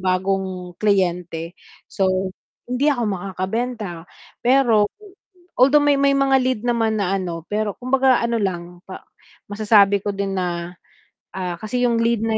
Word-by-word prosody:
bagong 185 -1 -1
kliyente. 175 -5 0 0.4
So, 185 -1 0 0.3
hindi 250 +4 0
ako 255 -5 +1
makakabenta. 195 0 -4 0.3
Pero, 240 -5 +3 0.7
although, 280 +3 +6
may 290 -1 +3
may 280 0 +4
mga 275 -1 +3
lead 255 -3 0
naman 230 -2 +1
na 195 -1 0
ano, 170 -4 -5
pero 210 -1 -1
kumbaga 260 0 +2
ano 235 0 0
lang, 175 -3 -4
pa 190 - -9 0.4
masasabi 205 -1 +4
ko - - -2
din 200 0 -2
na, 175 -1 -3 0.6
ah, 180 -2 -4
kasi 245 +3 -2
yung 235 -1 +1
lead 230 -1 +1
na 220 -1 +1
205 Hz, 140 wpm, -21 LUFS, 185-240 Hz, 0.7 s, although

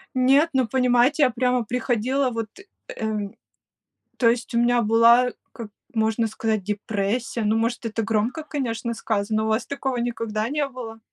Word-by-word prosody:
Нет, 270 +5 +4
ну 260 -3 +2
понимаете, 250 +4 +3
я 255 - +5
прямо 250 0 0
приходила 250 +3 0
вот, 225 -1 -3 0.5
эм 210 -2 -3 0.8
то 230 -2 +4
есть 235 +1 -2
у 235 - +2
меня 240 0 +3
была, 235 +3 +5 0.2
как 230 -3 -8 0.2
можно 220 0 +1
сказать, 220 -2 -2
депрессия, 210 +3 -2
ну, 215 +1 +2
может, 235 +2 -1
это 225 0 -2
громко, 225 +8 -1
конечно, 235 -6 -3
сказано. 215 -1 -1
У - - -1
вас 220 +2 0
такого 265 -3 -3
никогда 230 -2 -2
не 295 0 0
было? 235 -4 -9
235 Hz, 155 wpm, -23 LUFS, 220-250 Hz, 0.8 s, я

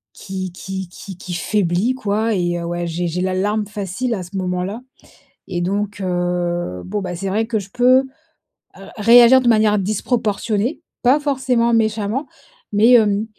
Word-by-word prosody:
qui 185 -2 -6
qui 190 +1 -6
qui 190 0 -10
qui 180 -1 -7
faiblit 195 +6 0
quoi 215 -1 -1
et 175 -1 -1
ouais 175 0 -3
j'ai 170 +1 -2
j'ai 180 +2 -2
la 185 0 -1
larme 205 +3 0
facile 205 +4 -3
à 190 - -3
ce 190 +3 -8
moment-là 185 +4 -3 0.7
et 175 -2 -3
donc, 200 +3 -2
heu, 175 - -2
bon, 205 +1 -3
bah, 180 -1 -4
c'est 195 +3 -4
vrai 220 +3 0
que 225 -2 -1
je 195 -1 -7
peux 255 +3 +4 0.7
ré - - -12 0.2
réagir 245 +2 +8
de 250 - -1
manière 215 -2 +4
disproportionnée, 215 - -1 0.2
pas 260 +4 +4
forcément 255 -5 +1
méchamment, 220 +4 0 0.4
mais, 215 +4 +4
hem, 215 -3 +4
205 Hz, 160 wpm, -19 LUFS, 180-230 Hz, 0.7 s, réagir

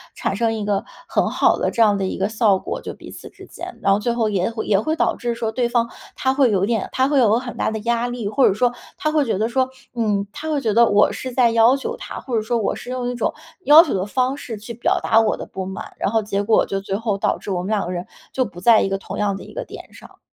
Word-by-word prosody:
产 195 - -2
生 225 0 +1
一 220 -1 -3
个 205 -1 -1 0.2
很 - - 0
好 - - +2
的 - - 0
这 235 - -1
样 210 -2 +5
的 195 - -1
一 185 - -3
个 195 +2 0
效 215 -3 +3
果 - - -5
就 - - -6
彼 - - -12
此 - - -10
之 - - -14
间。 - - -9
然 195 - +2
后 195 - +3
最 235 +2 -1
后 230 -2 0
也 195 -2 0
会 225 -1 -5
也 200 -2 +3
会 310 +9 -1
导 - - 0
致 240 -2 -2
说 225 -1 -2
对 245 +1 0
方 235 -1 0 0.3
他 260 - +1
会 270 -2 +3
有 195 -2 +2
点 225 -2 -1
他 260 +1 +2
会 285 -2 +3
有 225 -3 +4
很 245 -1 -7
大 - - 0
的 220 - -3
压 235 +2 0
力， 245 -4 -4
或 265 +5 +4
者 - - +3
说 240 +4 +2 0.3
他 305 - -1
会 305 -2 +2
觉 225 - -1
得 220 +3 0
说， 260 +1 +1 0.3
嗯， 210 -4 0
他 315 +7 -6
会 295 -2 0
觉 220 -5 0
得 235 +2 +6
我 205 0 +4
是 255 -1 -6
在 240 -2 +4
要 230 +3 +5
求 275 - -4
他， - - -7
或 245 -4 -2
者 - - +1
说 235 +2 -1
我 220 - 0
是 - - -9
用 250 -1 -2
一 245 - -3
种 240 - -1 0.3
要 305 +3 +9
求 320 - -3
的 190 -1 -1
方 255 +5 0
式 240 -5 -6
去 220 +3 -8
表 235 - 0
达 225 - +4
我 225 -1 +2
的 - - -7
不 190 - -6
满， 190 +1 -7
然 - - 0
后 220 +1 +1
结 200 -1 -1
果 215 +2 +3
就 195 - -2
最 195 0 -4
后 210 -1 -1
导 - - 0
致 205 - -7
我 180 - -1
们 - - -5
两 210 -2 0
个 175 - -4
人 175 0 -4 0.3
就 255 - 0
不 175 -6 -10
在 225 +2 +6
一 - - +1
个 195 0 -1
同 195 - -8
样 205 -1 0
的 195 - -8
一 - - -13
个 - - -5
点 - - -11
上。 - - -15
225 Hz, 320 characters per minute, -21 LUFS, 205-245 Hz, 0.3 s, 要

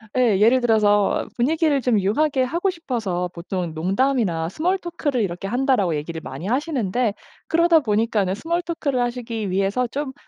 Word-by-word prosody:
예. 230 -6 +3
예를 240 +4 +5
들어서 210 -3 +2
분위기를 295 +2 +1
좀 230 -4 +2
유하게 260 +7 +1
하고 340 +9 0
싶어서 220 - -3
보통은 175 -1 -4
"농담이나 185 -1 0
스몰 360 - 0
토크를 300 -8 -2
이렇게 190 0 -3
한다."고 245 - +1
얘기를 160 +2 -5
많이 180 - -7
하시는데 250 - 0 0.3
그러다 335 0 +4
보니까는 210 -4 +1
스몰 340 +8 -2
토크를 290 -6 -2
하시기 235 -4 -3
위해서 195 +6 0
좀 275 +1 -4
240 Hz, 380 characters per minute, -22 LUFS, 195-280 Hz, 0.3 s, 예를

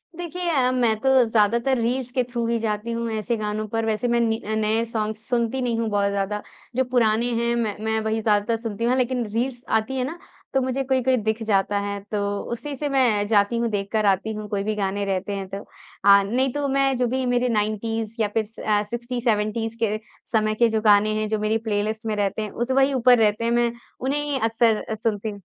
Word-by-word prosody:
देखिए 350 0 -4
अ, 260 -5 +2
मैं 240 -3 +2
तो 265 - +1 0.2
ज़्यादातर 235 +4 +2
रील्स 245 +2 -1
के 255 0 +1
थ्रू 240 -1 -2
ही 235 0 +1
जाती 215 +1 -2
हूँ 230 0 -2
ऐसे 220 +2 -1
गानों 215 0 -3
पर। 225 +1 -2
वैसे 220 +2 0
मैं 235 0 +2
नि 225 -1 +1
नए 220 +1 +1
सॉन्ग्स 220 -1 -4
सुनती 245 +1 0
नहीं 235 -2 0
हूँ 225 -1 0
बहुत 200 -1 +1
ज़्यादा, 200 +1 -2 0.3
जो 260 - +3
पुराने 230 -2 +3
हैं 235 +1 +1
मैं 220 -4 -1
मैं 220 0 +1
वही 220 0 -1
ज़्यादातर 210 +1 +2
सुनती 225 -1 -4
हूँ, 245 +2 +3
लेकिन 250 -1 0
रील्स 245 +1 -1
आती 220 +4 0
हैं 255 - 0
ना, 320 +6 -5 0.4
तो 265 - +3
मुझे 260 +1 -1
कोई-कोई 260 -1 +2
दिख 220 +1 -1
जाता 205 -1 +1
है। 200 0 -3
तो 205 -1 -1
उसी 245 +5 -4
से 290 +2 -3
मैं 235 -7 +2
जाती 205 +1 +3
हूँ, 235 0 0
देख 200 -2 -2
कर 215 -1 +1
आती 200 +2 +1
हूँ 215 0 -6
कोई 200 -1 -1
भी 215 +1 -1
गाने 200 0 -1
रहते 195 +1 -2
हैं 195 -1 -4
तो,, 200 +1 -6 0.6
नहीं 250 +7 0
तो 290 -1 -1
मैं 275 0 +2
जो 250 0 +1
भी 260 +2 -1
मेरे 245 0 +1
90s 220 0 -1
या 215 - +3
फिर 220 - +2 0.2
अ, 210 -1 +2
60-70s 230 -1 -2
के 215 -1 +1 0.3
समय 215 -2 +2
के 235 +1 +3
जो 220 -1 0
गाने 210 0 +4
हैं, 215 - -1
जो 215 0 0
मेरी 215 +1 +1
प्लेलिस्ट 215 +2 -1
में 215 -1 -1
रहते 205 +1 -1
हैं, 215 - -3
उस 240 +2 -2
वही 270 +1 +3
ऊपर 250 -1 +5
रहते 215 0 +2
हैं, 235 - +1
मैं 240 0 +2 0.3
उन्हें 275 +3 -1
ही 290 -2 -1
अक्सर 225 -1 +2
सुनती 220 -1 -2
हूँ। 205 -1 -9
225 Hz, 220 wpm, -23 LUFS, 210-245 Hz, 0.6 s, ऊपर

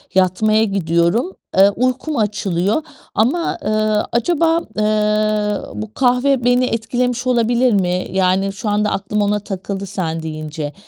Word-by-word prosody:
yatmaya 215 +4 +3
gidiyorum. 190 - +1 0.3
Eee, 195 +1 +7
uykum 255 +7 -1
açılıyor 205 - 0 0.3
ama, 280 +11 +1
eee, - - 0 0.4
acaba, 325 +7 +2 0.2
eee, 210 -1 +1 0.2
bu 215 0 -7
kahve 250 0 +2
beni 245 +1 +3
etkilemiş 245 +2 -1
olabilir 240 0 +2
mi? 180 -2 0
Yani, 190 +1 +1
şu 210 +2 -4
anda 210 0 +1
aklım 210 +2 -1
ona 205 0 +1
takıldı 195 0 -5
sen 165 -4 -3
deyince. 155 -1 -5
210 Hz, 125 wpm, -18 LUFS, 190-245 Hz, 0.4 s, Eee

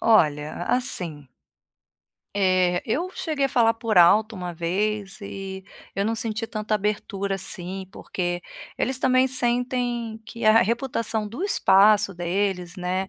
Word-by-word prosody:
olha, 155 -7 +2
assim 175 - 0 1.1
eh, 185 -2 +2
eu 335 +11 -1
cheguei 295 -4 -1
a - - -7
falar 230 -2 +3
por 225 -3 -2
alto 215 +5 +5
uma 180 -1 -5
vez 195 +4 -2
e, 195 -1 -7 0.3
eu 200 - 0
não 225 +2 0
senti 225 0 -3
tanta 215 -1 -2
abertura 200 -1 -2
assim 190 +1 -5
porque, 175 -3 -3 0.4
eles 260 +1 0
também 255 0 +3
sentem 245 -2 -1
que 230 - -7
a 215 +1 +7
a - - +6
reputação 230 -1 -1
do 240 - -4
espaço 205 - +4
deles, 180 0 -2
né, 185 +1 -2
210 Hz, 140 wpm, -24 LUFS, 185-230 Hz, 1.1 s, a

